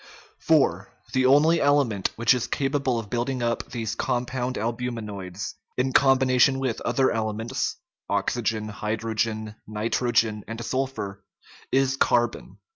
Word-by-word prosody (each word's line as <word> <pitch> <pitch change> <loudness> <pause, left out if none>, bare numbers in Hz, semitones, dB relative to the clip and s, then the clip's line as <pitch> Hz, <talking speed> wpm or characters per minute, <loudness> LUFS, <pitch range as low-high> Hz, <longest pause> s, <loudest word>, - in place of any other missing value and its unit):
IV. - - +3 0.3
The 130 0 +3
only 155 +5 +5
element 140 -9 +2
which 115 +1 +4
is 125 -2 -1
capable 135 -3 0
of 110 -3 -6
building 125 +1 -1
up 115 0 -1
these 115 -3 -3
compound 125 +1 -2
albuminates, 110 -5 -4 0.2
in 130 +1 0
combination 130 -1 +4
with 130 -4 -2
other 135 -1 +2
elements 110 +3 -2 0.3
(oxygen, 110 -2 -1
hydrogen, 110 0 -2
nitrogen, 110 0 0
and 115 0 -6
sul 130 +3 0
phur), 100 -7 -6 0.5
is 135 0 +2
carbon. 120 -3 +1
120 Hz, 120 wpm, -25 LUFS, 110-130 Hz, 0.5 s, only